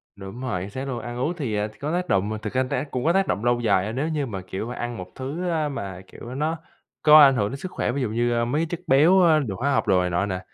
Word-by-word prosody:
Đúng 100 Hz, +5 st, -9 dB
rồi, 110 Hz, -9 st, -2 dB
chính 95 Hz, -, -6 dB
xác 130 Hz, +5 st, -5 dB
luôn. 125 Hz, -3 st, -3 dB
Ăn 120 Hz, +2 st, -6 dB
uống 150 Hz, +7 st, -1 dB
thì, 120 Hz, -8 st, -2 dB
à, 105 Hz, +1 st, 0 dB
có 150 Hz, +3 st, -3 dB
tác 180 Hz, 0 st, -1 dB
động, 105 Hz, +3 st, +1 dB
thực 105 Hz, -, -5 dB
ra 130 Hz, 0 st, +2 dB
tác 140 Hz, +3 st, -3 dB
cũng 125 Hz, -, -2 dB
có 170 Hz, -, +4 dB
tác 195 Hz, 0 st, +2 dB
động 105 Hz, +4 st, -2 dB
lâu 120 Hz, 0 st, +2 dB
dài 100 Hz, -5 st, +2 dB
á, 110 Hz, -, -3 dB
nếu 135 Hz, +6 st, -2 dB
như 150 Hz, -3 st, -1 dB
mà, 100 Hz, -6 st, -5 dB
kiểu, 95 Hz, +5 st, -5 dB
ăn 120 Hz, -1 st, -5 dB
một 90 Hz, 0 st, -8 dB
thứ, 155 Hz, +8 st, -4 dB
a, 155 Hz, -3 st, 0 dB
mà, 95 Hz, -8 st, -6 dB
kiểu, 125 Hz, +2 st, -10 dB
nó 155 Hz, +3 st, -1 dB, 0.4 s
có 155 Hz, 0 st, +8 dB
ảnh 135 Hz, -2 st, +7 dB
hưởng 105 Hz, -3 st, 0 dB
đến 135 Hz, -, -5 dB
sức 185 Hz, +5 st, -7 dB
khỏe, -, -, -1 dB
ví 140 Hz, +1 st, -2 dB
dụ 120 Hz, -, -1 dB
như, 120 Hz, +2 st, 0 dB
ơ, 120 Hz, 0 st, +1 dB
mấy 140 Hz, +6 st, 0 dB
cái -, -, +1 dB
chất 175 Hz, -, -4 dB
béo, 160 Hz, +8 st, +5 dB
ơ, 160 Hz, -3 st, +5 dB
đường 110 Hz, -9 st, -3 dB
hóa 140 Hz, +3 st, 0 dB
học -, -, 0 dB
đồ 95 Hz, -2 st, +4 dB
này 90 Hz, -, -1 dB
nọ 90 Hz, +3 st, 0 dB
nè, 95 Hz, -2 st, -3 dB
125 Hz, 315 wpm, -24 LUFS, 105-150 Hz, 0.4 s, có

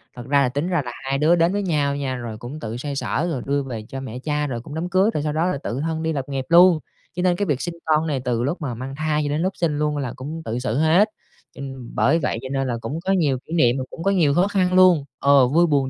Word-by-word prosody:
Thật 120 Hz, -, -8 dB
ra 140 Hz, 0 st, +3 dB
là 125 Hz, -, +2 dB
tính 145 Hz, +6 st, -2 dB
ra 175 Hz, -4 st, +1 dB
là 120 Hz, -, -5 dB
hai 135 Hz, +1 st, -1 dB
đứa 155 Hz, +4 st, +4 dB
đến 170 Hz, +2 st, +2 dB
với 205 Hz, -, -1 dB
nhau 145 Hz, -6 st, 0 dB
nha, 135 Hz, -2 st, -2 dB
rồi 115 Hz, -3 st, -6 dB
cũng 130 Hz, +7 st, -8 dB
tự 115 Hz, -3 st, -5 dB
xoay 140 Hz, +2 st, -4 dB
sở 155 Hz, +4 st, -1 dB
rồi 130 Hz, -, -3 dB
đưa 140 Hz, 0 st, 0 dB
về 115 Hz, -5 st, -6 dB
cho 135 Hz, -2 st, -5 dB
mẹ 125 Hz, -2 st, -6 dB
cha, 150 Hz, +2 st, -1 dB
rồi 120 Hz, -4 st, -4 dB
cũng 145 Hz, -, -9 dB
đám 170 Hz, +3 st, -3 dB
cưới, 190 Hz, +4 st, +3 dB
rồi 150 Hz, -, -1 dB
sau 150 Hz, -1 st, -1 dB
đó 160 Hz, +2 st, +1 dB
là 180 Hz, -4 st, 0 dB
tự 120 Hz, -, -3 dB
thân 160 Hz, 0 st, -2 dB
đi 160 Hz, -, 0 dB
lập 135 Hz, -2 st, -4 dB
nghiệp 135 Hz, -2 st, -3 dB
luôn. 175 Hz, -1 st, +7 dB, 0.4 s
Cho 180 Hz, -, -2 dB
nên 180 Hz, -1 st, +3 dB
cái 205 Hz, -, -1 dB
việc 145 Hz, -7 st, -1 dB
sinh 175 Hz, -1 st, -4 dB
con 155 Hz, 0 st, +2 dB
này 145 Hz, -4 st, -1 dB
từ 120 Hz, -1 st, 0 dB
lúc 160 Hz, +6 st, -2 dB
mà 135 Hz, -4 st, -3 dB
mang 130 Hz, +4 st, -6 dB
thai 155 Hz, 0 st, 0 dB
cho -, -, -1 dB
đến 150 Hz, +2 st, -1 dB
lúc 185 Hz, +2 st, -1 dB
sinh 155 Hz, -4 st, 0 dB
luôn 150 Hz, -1 st, 0 dB
là 135 Hz, -4 st, -3 dB
cũng 150 Hz, +5 st, -6 dB
tự 115 Hz, +2 st, -2 dB
xử 125 Hz, -1 st, -2 dB
hết. 170 Hz, +8 st, +4 dB, 0.5 s
Cho -, -, -9 dB
n 135 Hz, -3 st, -7 dB
bởi 165 Hz, -, +3 dB
vậy 135 Hz, -, -1 dB
cho 130 Hz, -, -7 dB
nên 135 Hz, -1 st, 0 dB
là 120 Hz, -2 st, -2 dB
cũng 145 Hz, +8 st, -4 dB
có 195 Hz, -, +1 dB
nhiều 150 Hz, -8 st, +2 dB
kỷ 160 Hz, -, -8 dB
niệm 130 Hz, -6 st, +3 dB
rồi 130 Hz, -, -3 dB
cũng 165 Hz, -, -8 dB
có 195 Hz, -, +2 dB
nhiều 160 Hz, -7 st, +3 dB
khó 180 Hz, +4 st, +3 dB
khăn 185 Hz, -3 st, +1 dB
luôn, 180 Hz, -6 st, +5 dB
ờ, 140 Hz, -2 st, +5 dB
vui 170 Hz, +6 st, +3 dB
buồn 140 Hz, -4 st, +1 dB
145 Hz, 305 wpm, -22 LUFS, 130-165 Hz, 0.5 s, luôn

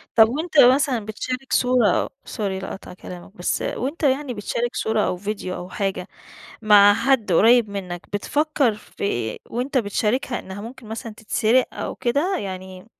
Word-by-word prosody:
طب 225 Hz, -1 st, +7 dB
وأنت 310 Hz, +4 st, 0 dB
مثلًا 255 Hz, -3 st, +5 dB
بتشارك 255 Hz, +5 st, -5 dB
صورة 245 Hz, -6 st, +3 dB, 0.2 s
sorry -, -, -9 dB, 0.2 s
لِقَطْع 190 Hz, -, -8 dB
كلامك، 180 Hz, +3 st, -11 dB
بس -, -, -1 dB
وأنت 440 Hz, -, -3 dB
يعني 275 Hz, -1 st, +1 dB
بتشارك 235 Hz, +3 st, -3 dB
صورة 220 Hz, -1 st, 0 dB
أو 180 Hz, -, 0 dB
فيديو 200 Hz, -1 st, -4 dB
أو 180 Hz, -, -7 dB
حاجة 195 Hz, -2 st, -3 dB, 0.6 s
مع 205 Hz, -1 st, +7 dB
حد 230 Hz, -3 st, +1 dB
قريب 225 Hz, +4 st, +5 dB
منّك، 180 Hz, -3 st, -6 dB
بتفكّر 285 Hz, +3 st, +1 dB
في 210 Hz, -, -13 dB
إيه 120 Hz, -, -2 dB
وأنت 255 Hz, +3 st, -1 dB
بتشاركها 235 Hz, +3 st, -1 dB
إنّها 190 Hz, +1 st, -8 dB
ممكن 235 Hz, +3 st, -10 dB
مثلًا 225 Hz, 0 st, -6 dB
تتسرق 225 Hz, +3 st, +2 dB
أو -, -, -4 dB
كده؟ 290 Hz, +11 st, 0 dB
يعني 185 Hz, -1 st, -7 dB
225 Hz, 150 wpm, -22 LUFS, 200-255 Hz, 0.6 s, طب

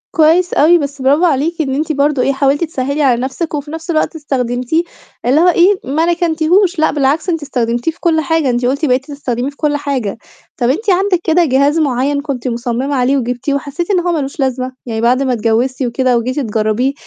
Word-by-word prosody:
كويس 335 Hz, +3 st, +3 dB
أوي 330 Hz, +4 st, +5 dB
بس 280 Hz, -3 st, -5 dB
برافو 285 Hz, +6 st, +3 dB
عليكِ 320 Hz, +2 st, 0 dB
إن 265 Hz, -3 st, -2 dB
أنتِ 310 Hz, +2 st, -1 dB
برضه 285 Hz, -2 st, +1 dB
إيه، 275 Hz, -, +1 dB
حاولتِ 275 Hz, +3 st, +1 dB
تسهّلي 280 Hz, -2 st, -2 dB
على 250 Hz, -4 st, +2 dB
نَفْسِك، 270 Hz, +6 st, -4 dB
وفي 295 Hz, 0 st, -4 dB
نَفْس 325 Hz, +2 st, -8 dB
الوقت 310 Hz, 0 st, 0 dB
استخدمتيه 255 Hz, +1 st, -1 dB, 0.4 s
اللي 270 Hz, +6 st, +3 dB
هو 355 Hz, -, +4 dB
إيه، 360 Hz, +3 st, +4 dB
ما 295 Hz, +6 st, 0 dB
ركنتيهوش 345 Hz, +2 st, +1 dB
لأ، 315 Hz, -, +3 dB
بالعكس 295 Hz, +4 st, 0 dB
أنتِ 330 Hz, -2 st, -1 dB
استخدمتيه 240 Hz, 0 st, -1 dB
في 325 Hz, -, -24 dB
كلّ 325 Hz, -2 st, +1 dB
حاجة، 315 Hz, -2 st, 0 dB
أنتِ 245 Hz, 0 st, 0 dB
قُلتِ 280 Hz, +5 st, 0 dB
بقيتِ 260 Hz, -1 st, +1 dB
تستخدميه 270 Hz, -3 st, -3 dB
في 285 Hz, -, -14 dB
كلّ 295 Hz, -2 st, 0 dB
حاجة، 265 Hz, -9 st, -3 dB, 0.4 s
طَب 240 Hz, -, +1 dB
أنتِ 400 Hz, -, -1 dB
عندِك 375 Hz, -1 st, +2 dB
كده 340 Hz, +1 st, +3 dB
جهاز 280 Hz, +3 st, +2 dB
معيّن 280 Hz, 0 st, 0 dB
كنتِ 270 Hz, -4 st, -4 dB
مصممة 245 Hz, +3 st, -2 dB
عليه 260 Hz, +2 st, +2 dB
وجبتيه 250 Hz, +2 st, -2 dB
وحسّيتِ 285 Hz, +6 st, -3 dB
إن 375 Hz, -, +3 dB
هو 350 Hz, 0 st, -1 dB
ما 330 Hz, -, 0 dB
لوش 275 Hz, +2 st, -5 dB
لازمة؟ 260 Hz, -1 st, -1 dB
يعني 225 Hz, -2 st, -3 dB
بعد 250 Hz, +3 st, +2 dB
ما 260 Hz, -2 st, 0 dB
اتجوّزتِ 235 Hz, +4 st, 0 dB
وكده 250 Hz, 0 st, +1 dB
وجيتِ 255 Hz, +4 st, -2 dB
تجربيه 225 Hz, +2 st, 0 dB
280 Hz, 205 wpm, -15 LUFS, 255-320 Hz, 0.4 s, أوي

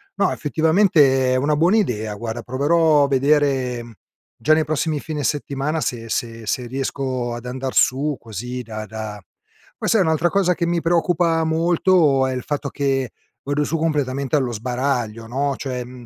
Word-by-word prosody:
no, -, -, +2 dB
effettivamente, 150 Hz, -5 st, +3 dB
è -, -, +2 dB
una 145 Hz, +3 st, +1 dB
buona 175 Hz, +8 st, +3 dB
idea, 110 Hz, -, -1 dB
guarda, 115 Hz, +2 st, -5 dB
proverò 150 Hz, +3 st, +3 dB
a -, -, +2 dB
vedere 135 Hz, -4 st, +1 dB, 0.5 s
già 155 Hz, -, +4 dB
nei 155 Hz, 0 st, +3 dB
prossimi 155 Hz, 0 st, -1 dB
fine 150 Hz, -1 st, -4 dB
settimana 145 Hz, +2 st, -1 dB
se 115 Hz, -2 st, -3 dB
se 115 Hz, -2 st, -3 dB
se 125 Hz, +1 st, -1 dB
riesco 130 Hz, -1 st, -3 dB
ad 120 Hz, +1 st, -9 dB
andar 130 Hz, +1 st, -4 dB
su 140 Hz, +1 st, +2 dB
così 120 Hz, +3 st, -6 dB
da 110 Hz, -2 st, -7 dB
da 110 Hz, -1 st, -7 dB, 0.6 s
poi, -, -, -3 dB
sai, 220 Hz, -, +4 dB
un'altra 160 Hz, 0 st, +2 dB
cosa 180 Hz, -2 st, +2 dB
che 170 Hz, -, -1 dB
mi 170 Hz, 0 st, 0 dB
preoccupa 165 Hz, -1 st, +2 dB
molto 160 Hz, -3 st, +3 dB
è 130 Hz, -, -2 dB
il 125 Hz, -, -3 dB
fatto 145 Hz, -1 st, -3 dB
che 135 Hz, -4 st, -1 dB, 0.3 s
vado 145 Hz, +1 st, 0 dB
su 165 Hz, +2 st, -1 dB
completamente 140 Hz, -3 st, -1 dB
allo 130 Hz, -4 st, +1 dB
sbaraglio, 120 Hz, -1 st, -2 dB
no, 140 Hz, +3 st, -1 dB
cioè, 125 Hz, -2 st, -4 dB
mhmm, 125 Hz, 0 st, -12 dB
140 Hz, 170 wpm, -21 LUFS, 125-155 Hz, 0.6 s, già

